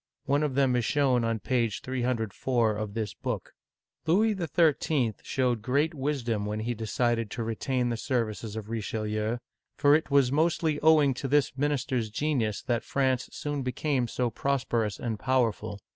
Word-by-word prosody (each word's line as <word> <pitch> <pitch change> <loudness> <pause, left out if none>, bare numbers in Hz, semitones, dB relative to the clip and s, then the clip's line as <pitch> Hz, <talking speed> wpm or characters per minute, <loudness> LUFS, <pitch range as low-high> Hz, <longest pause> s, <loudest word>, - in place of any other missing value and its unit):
One 145 +1 +2
of 150 -4 -1
them 135 -2 +3
is 120 - +1
shown 130 -1 +2
on 115 0 0
page 120 -5 0
304 120 -2 0
of 105 -1 -4
this 110 -3 -2
book. - - -4 0.5
Louis 215 +7 +4
XII 170 -4 +3 0.4
L - - -8
showed 125 -4 0
great 140 +8 +1
wisdom 130 -7 -1
when 105 +1 -2
he 120 +2 -1
decided 115 0 0
to 115 - -4
retain 120 +2 -1
the 120 - -1
services 115 -3 -2
of 110 -2 -5
Richelieu, 110 0 -2 0.4
for 145 0 +5
it 155 +1 +2
was 140 -3 +4
inostly 160 0 +1
owing 155 -3 +5
to 135 +2 -4
this 140 -1 +2
minister's 130 -5 0
genius 115 -4 -1
that 120 -2 0
France 130 -2 0
soon 145 -1 -3
became 130 0 -1
so 120 +1 -1
prosper 125 -3 0
ous 105 -2 -4
and 115 -3 -3
powerful. 120 -5 0
125 Hz, 165 wpm, -28 LUFS, 115-140 Hz, 0.5 s, for